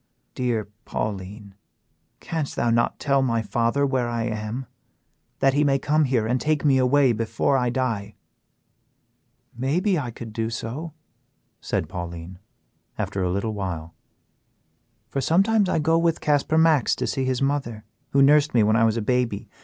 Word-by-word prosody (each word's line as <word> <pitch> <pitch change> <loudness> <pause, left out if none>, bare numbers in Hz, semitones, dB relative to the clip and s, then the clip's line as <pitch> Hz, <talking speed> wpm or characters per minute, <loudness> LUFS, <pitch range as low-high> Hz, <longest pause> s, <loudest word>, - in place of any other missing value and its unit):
Dear 120 -5 -1 0.2
Pauline, 100 -1 -5 0.7
canst 160 -4 -3
thou 120 - +1
not 120 +1 +1
tell 140 -1 +2
my 115 -3 0
father 120 +6 +1
where 130 -3 0
I 115 -1 -2
am, 110 +3 -4 0.8
that 135 -1 +4
he 145 +2 +3
may 140 -2 +3
come 150 +3 +2
here 125 -5 +1
and 125 +3 0
take 155 -1 0
me 135 -2 +4
away 130 +1 +4
before 115 +4 0
I 125 -2 +1
die?" 120 -5 -2 1.4
"Mayhap 155 - 0
I 125 - -5
could 115 -1 -9
do 115 0 -2
so," 125 +8 -5 0.7
said - - -2
Pauline, 85 0 -7 0.6
after 100 - -2
a 90 - 0
little 100 +4 -2
while, 85 -5 -5 1.1
"for 135 +4 -3
sometimes 195 - +3
I - - +1
go 165 +1 +2
with 165 -1 +1
Casper 150 +1 +1
Max 160 -5 +4
to - - -2
see 135 - -1
his 130 0 0
mother, 135 -6 -2 0.3
who 140 0 +4
nursed 150 0 +4
me 115 - +5
when 110 +1 +3
I 115 0 +4
was 110 0 +1
a 115 - -1
baby. 125 -3 -1
125 Hz, 160 wpm, -24 LUFS, 110-145 Hz, 1.4 s, me